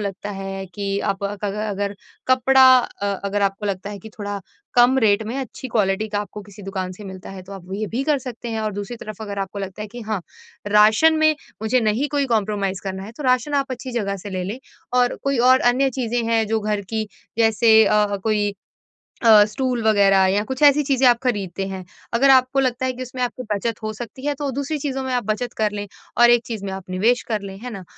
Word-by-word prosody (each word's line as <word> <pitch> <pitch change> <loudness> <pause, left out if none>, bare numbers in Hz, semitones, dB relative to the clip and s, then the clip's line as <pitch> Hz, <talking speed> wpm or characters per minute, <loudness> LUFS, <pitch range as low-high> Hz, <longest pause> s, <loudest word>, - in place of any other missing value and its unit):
लगता 200 0 -4
है 195 -1 -5
कि 200 -1 -2
आप 200 -1 -2
अक 205 +1 -4
अग 200 -1 -2
अगर 200 -1 -2 0.3
कपड़ा 260 +1 +5 0.2
अ, 220 -4 -4 0.2
अगर 200 +1 -1
आपको 195 +1 -1
लगता 200 0 -3
है 205 - -7
कि 220 - -11
थोड़ा 205 -1 -4 0.3
कम 245 +2 +5
रेट 215 -2 +3
में 230 - -4
अच्छी 260 0 -6
क्वालिटी 215 -2 0
का 205 -1 -2
आपको 210 0 -7
किसी 205 0 -13
दुकान 190 -1 -4
से 205 +3 -11
मिलता 190 -1 -9
है, 190 -1 -9
तो 190 +2 -12
आप 190 -3 -10
ये 215 +1 -2
भी 255 - 0
कर 300 -1 +2
सकते 245 -2 -7
हैं 225 -1 -2
और 215 -1 -2
दूसरी 205 +4 -5
तरफ़ 215 -2 -8
अगर 200 -1 -5
आपको 195 +1 -5
लगता 195 +2 -6
है 210 - -7
कि 240 - -7
हाँ, 215 -3 -1 0.5
राशन 215 +10 +5
में 310 0 +4 0.3
मुझे 245 +3 +2
नहीं 225 +6 +1
कोई 285 -1 +1
कॉम्प्रोमाइज़ 200 -3 -1
करना 190 0 -4
है, 220 - -9
तो 295 - -9
राशन 255 +3 +2
आप 275 -2 0
अच्छी 255 +1 -6
जगह 200 -4 -1
से 200 +2 -8
ले 185 -1 -3
लें। 205 +7 -4 0.4
और 245 0 +2
कोई 275 -2 +1
और 260 0 +6
अन्य 270 +2 +1
चीज़ें 240 -2 -1
हैं 225 -1 +2
जो 220 0 +1
घर 210 0 -1
की, 220 -1 -1 0.3
जैसे 225 0 +5
अ, 210 -1 +2
कोई 210 -2 +1 0.7
अ, 215 -2 +8
स्टूल 250 +2 -2
वगैरह 200 -3 +4
या 200 +2 +1
कुछ 260 +5 -5
ऐसी 290 0 +7
चीज़ें 270 -2 +3
आप 240 -1 +5
खरीदते 195 -6 -2
हैं। 190 -1 -6 0.3
अगर 265 +4 +4
आपको 260 0 +5
लगता 260 -1 0
है 255 - -1
कि 255 +1 -6
उसमें 255 0 -7
आपकी 250 +1 -3
बचत 210 +2 -3
हो 215 - -2
सकती 240 +4 -8
है, 290 - +1
तो 285 0 -3
दूसरी 280 +4 -2
चीज़ों 270 -2 -3
में 260 -1 -3
आप 245 -2 0
बचत 215 +3 -2
कर 215 -1 +1
लें 205 0 -5 0.3
और 240 0 +7
एक 240 0 +4
चीज़ 220 -4 -5
में 195 - -4
आप 190 -1 -8
निवेश 220 +7 +2
कर 215 -3 -1
लें। 195 -1 -8
है 250 +3 -6
ना? 195 - -7
215 Hz, 235 wpm, -22 LUFS, 200-250 Hz, 0.7 s, अ